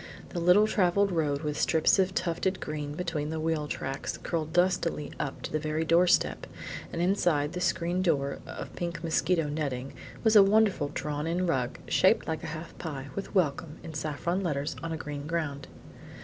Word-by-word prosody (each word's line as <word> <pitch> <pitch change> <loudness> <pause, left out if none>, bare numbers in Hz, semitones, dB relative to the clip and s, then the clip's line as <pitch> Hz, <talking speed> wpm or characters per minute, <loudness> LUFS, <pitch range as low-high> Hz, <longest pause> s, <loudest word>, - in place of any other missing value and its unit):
The 175 - -3
little 180 +5 +6
traveled 200 -1 +2
road 150 -3 0
with 150 -1 -2
strips 160 +4 +4
of 190 0 +2
tufted 185 +2 0
green 150 -1 -4
between 160 -4 -2
the 160 0 -3
wheel 155 -1 0
tracks 135 -1 -4
curled 160 -2 -3
dustily 175 -4 +1
up 140 -3 -4
to - - -4
the 155 - 0
very 155 +1 -1
doorstep, 170 +2 +3 0.4
and - - -4
inside 175 -5 +2
the 180 - -3
screen 175 +1 +1
door 140 -6 +1
of - - -7
pink 170 -1 -4
mosquito 165 0 +1
netting 140 -3 -3 0.3
was 220 -1 +4
a 210 - +11
wonderful 200 -6 +4
drawn 150 +1 -3
in 175 +2 0
rug, 130 -7 0
shaped - - +3
like 160 -1 -2
a - - -4
half 165 +1 -7
pie, 140 -4 -5
with 200 - -6
"Welcome" 160 -2 0
in 160 - -7
saffron 155 +4 -2
letters 145 -5 -1
on 165 - -4
a 160 - -2
green 145 -1 -6
ground. 150 -4 -2
160 Hz, 180 wpm, -29 LUFS, 150-180 Hz, 0.4 s, a